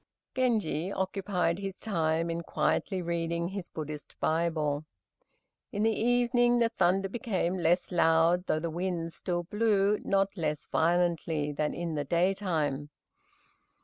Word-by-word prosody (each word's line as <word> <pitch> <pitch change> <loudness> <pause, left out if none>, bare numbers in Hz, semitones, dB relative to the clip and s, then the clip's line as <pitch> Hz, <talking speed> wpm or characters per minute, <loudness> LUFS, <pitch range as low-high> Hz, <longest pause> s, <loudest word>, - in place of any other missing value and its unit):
Genji 215 -9 0
occupied 190 -2 -1
his 195 -1 -5
time 165 -4 0
in 165 0 -2
quietly 185 +2 0
reading 170 0 -1
his 195 -2 -6
Buddhist 150 -1 -7
Bible. 155 -3 0 0.9
In 205 - -1
the 225 0 +3
evening, 245 +1 +3
the 230 -1 +3
thunder 195 -2 +2
became 190 -4 -1
less 175 +2 +2
loud, 170 +1 +3
though - - +2
the 165 +1 -3
wind 170 -1 -2
still 175 -1 -2
blew 210 +1 +2
not 195 0 +1
less 150 -4 -2
violently 165 -3 +1
than 150 +1 -1
in 170 -1 -3
the 145 -1 -1
daytime. 170 -4 0
175 Hz, 130 wpm, -29 LUFS, 165-195 Hz, 0.9 s, the